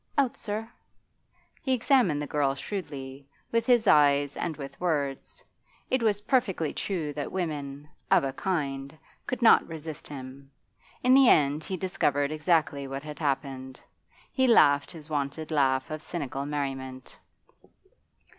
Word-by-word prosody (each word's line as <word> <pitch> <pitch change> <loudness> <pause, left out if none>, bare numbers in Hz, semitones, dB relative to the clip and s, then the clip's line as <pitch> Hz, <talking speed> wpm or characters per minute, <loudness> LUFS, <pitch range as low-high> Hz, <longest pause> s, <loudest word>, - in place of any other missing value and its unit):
'Out, 270 -4 +2
sir.' 215 +1 -4 0.9
He 265 - 0
examined 245 - +3
the 150 - -3
girl 140 -2 0
shrewdly, 140 -5 -6 0.2
with 230 +1 +1
his 240 -3 +4
eyes 145 -4 +4
and 165 -4 -3
with 135 0 -9
words. 145 -6 -2 0.5
It 260 - +2
was 210 -3 +1
perfectly 205 - 0
true 165 -7 -3
that 145 0 -4
women 145 -5 -4 0.2
of - - +5
a 135 -1 -2
kind 140 -4 -3 0.3
could 255 -1 -3
not 225 - +6
resist 160 -1 -7
him. 135 -1 -9 0.5
In 255 +1 +5
the 270 -2 +7
end 145 +1 +3
he 185 - -4
discovered 145 -6 0
exactly 155 -3 +1
what 135 +1 -5
had 150 0 -8
happened. 135 -3 -3 0.5
He 260 -1 +2
laughed 145 - +5
his 155 -3 -11
wonted 150 +1 -3
laugh 135 -2 +1
of 155 0 -4
cynical 140 -4 -4
merriment. 135 -3 -5
150 Hz, 140 wpm, -28 LUFS, 140-185 Hz, 0.9 s, the